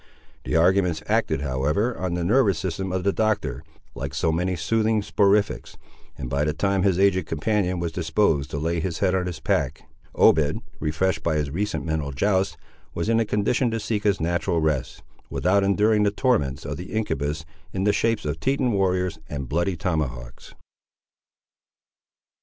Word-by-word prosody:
The -, -, -1 dB
arguments 90 Hz, -1 st, +3 dB
acted, 70 Hz, -, +1 dB
however, 70 Hz, -, 0 dB
on 90 Hz, -2 st, -2 dB
the 90 Hz, -, -2 dB
nervous 100 Hz, -1 st, +3 dB
system 95 Hz, +2 st, -3 dB
of 95 Hz, 0 st, -1 dB
the 100 Hz, 0 st, +2 dB
Doctor, 110 Hz, -2 st, 0 dB, 0.3 s
like 70 Hz, 0 st, -5 dB
so 80 Hz, +3 st, +1 dB
many 90 Hz, +3 st, 0 dB
soothing 110 Hz, +6 st, +1 dB
soporifics, 100 Hz, 0 st, +1 dB, 0.4 s
and 70 Hz, -, -5 dB
by 70 Hz, +3 st, 0 dB
the 75 Hz, 0 st, 0 dB
time 95 Hz, +4 st, 0 dB
his 95 Hz, -2 st, +2 dB
aged 95 Hz, -3 st, +2 dB
companion 90 Hz, +2 st, 0 dB
was 85 Hz, -1 st, -2 dB
disposed 80 Hz, -3 st, +1 dB
to -, -, -4 dB
lay 85 Hz, +3 st, -1 dB
his 80 Hz, -1 st, -3 dB
head 95 Hz, 0 st, +1 dB
on 90 Hz, -1 st, 0 dB
his 85 Hz, -3 st, -5 dB
pack, -, -, -1 dB, 0.3 s
Obed, 75 Hz, -2 st, +4 dB, 0.2 s
refreshed 80 Hz, +3 st, 0 dB
by 80 Hz, -2 st, 0 dB
his 75 Hz, -2 st, -1 dB
recent 105 Hz, +5 st, -2 dB
mental 80 Hz, -3 st, -2 dB
joust, 95 Hz, +7 st, 0 dB, 0.4 s
was 85 Hz, +6 st, -2 dB
in 115 Hz, 0 st, +3 dB
a 115 Hz, -, +2 dB
condition 105 Hz, +5 st, +1 dB
to 115 Hz, 0 st, -2 dB
seek 105 Hz, 0 st, -2 dB
his 100 Hz, -2 st, +2 dB
natural 85 Hz, +1 st, 0 dB
rest, 75 Hz, -5 st, -1 dB, 0.3 s
without 100 Hz, +2 st, +2 dB
enduring 105 Hz, +2 st, +3 dB
the 105 Hz, -, +4 dB
torments 100 Hz, -, 0 dB
of 75 Hz, +2 st, -4 dB
the 90 Hz, -, -8 dB
incubus, 80 Hz, -8 st, -2 dB, 0.3 s
in 95 Hz, -, -2 dB
the 105 Hz, 0 st, +3 dB
shapes 115 Hz, -4 st, 0 dB
of 75 Hz, +2 st, -2 dB
Teton 135 Hz, -, +1 dB
warriors 90 Hz, -4 st, 0 dB
and 70 Hz, -3 st, -4 dB
bloody 85 Hz, +6 st, 0 dB
tomahawks. 75 Hz, -9 st, -4 dB
90 Hz, 170 wpm, -24 LUFS, 80-100 Hz, 0.4 s, Obed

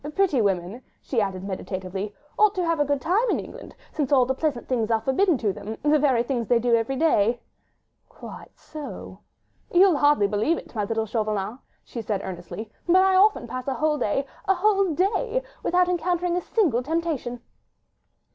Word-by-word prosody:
"Pretty 370 Hz, -11 st, +2 dB
women," 195 Hz, +3 st, -1 dB, 0.2 s
she 240 Hz, -5 st, -1 dB
added 190 Hz, -2 st, -3 dB
meditatively, 190 Hz, +1 st, -5 dB, 0.2 s
"ought 425 Hz, -1 st, +4 dB
to 365 Hz, -2 st, 0 dB
have 330 Hz, -2 st, 0 dB
a 290 Hz, -, +3 dB
good 285 Hz, 0 st, 0 dB
time 395 Hz, -, +1 dB
in -, -, +1 dB
England, -, -, -10 dB, 0.2 s
since 295 Hz, -3 st, -2 dB
all 260 Hz, -3 st, +5 dB
the 265 Hz, -, 0 dB
pleasant 275 Hz, -3 st, -2 dB
things 235 Hz, -4 st, 0 dB
are 225 Hz, -1 st, +2 dB
forbidden 305 Hz, -, +2 dB
them—the 225 Hz, +7 st, -1 dB
very 260 Hz, -5 st, +2 dB
things 240 Hz, -3 st, -2 dB
they 240 Hz, -, +4 dB
do 235 Hz, +1 st, +1 dB
every 230 Hz, +4 st, -1 dB
day." 240 Hz, -6 st, +2 dB, 0.7 s
"Quite -, -, -12 dB
so!" 305 Hz, -2 st, -9 dB, 0.5 s
"You'll 365 Hz, -2 st, +5 dB
hardly 290 Hz, -7 st, +4 dB
believe 215 Hz, +11 st, +1 dB
it, -, -, -11 dB
my 210 Hz, -3 st, -1 dB
little 225 Hz, +1 st, -1 dB
Chauvelin," 215 Hz, 0 st, -2 dB, 0.2 s
she 235 Hz, -, -7 dB
said 205 Hz, -2 st, -2 dB
earnestly, 190 Hz, +4 st, -7 dB, 0.2 s
"but 350 Hz, -, +4 dB
I 380 Hz, 0 st, +3 dB
often 400 Hz, -, +4 dB
pass 255 Hz, +2 st, -6 dB
a 270 Hz, -, -1 dB
whole 305 Hz, 0 st, 0 dB
day—a 275 Hz, -, -1 dB
whole 395 Hz, -1 st, +2 dB
day—without 395 Hz, -2 st, 0 dB
encountering 355 Hz, 0 st, 0 dB
a 360 Hz, -, 0 dB
single 330 Hz, -, +1 dB
temptation." 300 Hz, -5 st, -2 dB
265 Hz, 170 wpm, -24 LUFS, 220-345 Hz, 0.7 s, all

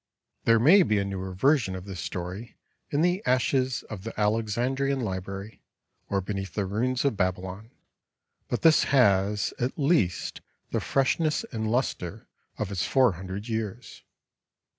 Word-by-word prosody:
'" -, -, -53 dB
There 115 Hz, 0 st, +6 dB
may 165 Hz, -, +7 dB
be 110 Hz, -, +2 dB
a 100 Hz, -, +1 dB
newer 95 Hz, -1 st, -4 dB
version 110 Hz, 0 st, +2 dB
of 90 Hz, 0 st, -7 dB
this 95 Hz, -3 st, -7 dB
story 90 Hz, +6 st, -6 dB, 0.3 s
in 145 Hz, -, +1 dB
the 180 Hz, +2 st, +2 dB
ashes 130 Hz, -, +1 dB
of 105 Hz, -4 st, -8 dB
the 115 Hz, -1 st, -6 dB
Alexandrian 120 Hz, +6 st, 0 dB
library 100 Hz, -1 st, -5 dB, 0.5 s
or 100 Hz, -1 st, +1 dB
beneath 95 Hz, -1 st, -5 dB
the 100 Hz, -, 0 dB
ruins 125 Hz, +7 st, -1 dB
of 140 Hz, -, +2 dB
Babylon, 95 Hz, +3 st, -2 dB, 0.8 s
but 120 Hz, -, -3 dB
this 160 Hz, -2 st, +6 dB
has 105 Hz, -6 st, +3 dB
at 125 Hz, +2 st, -2 dB
least 140 Hz, -, +1 dB, 0.3 s
the -, -, +1 dB
freshness 150 Hz, +3 st, +1 dB
and 110 Hz, -3 st, -2 dB
luster 115 Hz, -8 st, -2 dB, 0.3 s
of 105 Hz, -2 st, -3 dB
its 95 Hz, -3 st, -1 dB
four 130 Hz, -4 st, +4 dB
hundred 95 Hz, +4 st, -6 dB
years. 110 Hz, +1 st, -4 dB
110 Hz, 150 wpm, -27 LUFS, 95-130 Hz, 0.8 s, may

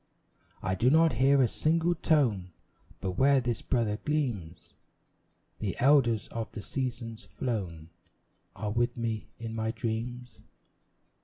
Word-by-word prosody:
I 95 Hz, -, 0 dB
do 115 Hz, +7 st, +3 dB
not 160 Hz, +1 st, +5 dB
hear 135 Hz, +3 st, +4 dB
a -, -, +4 dB
single 165 Hz, +6 st, +1 dB
tone; 120 Hz, -, +1 dB, 0.5 s
But 95 Hz, -2 st, -3 dB
where 140 Hz, 0 st, +5 dB
this 120 Hz, -3 st, -2 dB
brother 115 Hz, -5 st, 0 dB
gleams, 120 Hz, -, -2 dB, 0.9 s
The 100 Hz, -5 st, -3 dB
elders 125 Hz, -5 st, +4 dB
of 115 Hz, -1 st, -5 dB
the 105 Hz, -, -6 dB
seasons 115 Hz, -4 st, -4 dB
flown 95 Hz, -6 st, -4 dB, 0.6 s
Are 105 Hz, -1 st, -3 dB
with 120 Hz, +2 st, 0 dB
me 115 Hz, -2 st, -2 dB
in 115 Hz, -1 st, -6 dB
my 110 Hz, 0 st, -1 dB
dreams. 120 Hz, +1 st, -4 dB
115 Hz, 130 wpm, -29 LUFS, 105-130 Hz, 0.9 s, not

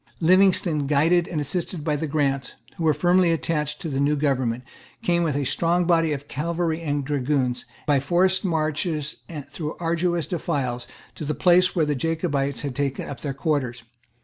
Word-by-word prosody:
Livingstone, 175 Hz, -4 st, +4 dB
guided 165 Hz, +4 st, +3 dB
and 160 Hz, -, -3 dB
assisted 160 Hz, +2 st, -2 dB
by 150 Hz, -1 st, 0 dB
the 155 Hz, +2 st, -2 dB
Grants, 140 Hz, -3 st, -1 dB, 0.2 s
who 165 Hz, -, -2 dB
were 155 Hz, -, +5 dB
firmly 180 Hz, 0 st, +3 dB
attached 150 Hz, -2 st, -1 dB
to -, -, -4 dB
the 135 Hz, -3 st, -2 dB
new 145 Hz, +2 st, +2 dB
government, 130 Hz, -4 st, 0 dB, 0.4 s
came, 175 Hz, -1 st, +2 dB
with 160 Hz, -5 st, 0 dB
a 145 Hz, -, 0 dB
strong 170 Hz, +6 st, +1 dB
body 165 Hz, -2 st, +3 dB
of 145 Hz, -1 st, -4 dB
cavalry 165 Hz, +2 st, -2 dB
and 145 Hz, -3 st, -1 dB
dragoons, 135 Hz, -3 st, 0 dB, 0.2 s
by 145 Hz, -3 st, +3 dB
forced 180 Hz, +6 st, +2 dB
marches 155 Hz, -2 st, -1 dB
and 150 Hz, -5 st, -7 dB
through 150 Hz, +1 st, -5 dB
arduous 170 Hz, 0 st, 0 dB
defiles, 140 Hz, -9 st, -2 dB, 0.3 s
to -, -, -7 dB
the 150 Hz, 0 st, -2 dB
place 180 Hz, 0 st, +4 dB
where 165 Hz, -3 st, +3 dB
the 150 Hz, -, 0 dB
Jacobites 140 Hz, -2 st, -1 dB
had 140 Hz, -3 st, -4 dB
taken 140 Hz, -1 st, -2 dB
up 135 Hz, -, -6 dB
their 140 Hz, -1 st, -4 dB
quarters. 135 Hz, -4 st, -1 dB
150 Hz, 175 wpm, -24 LUFS, 140-170 Hz, 0.4 s, were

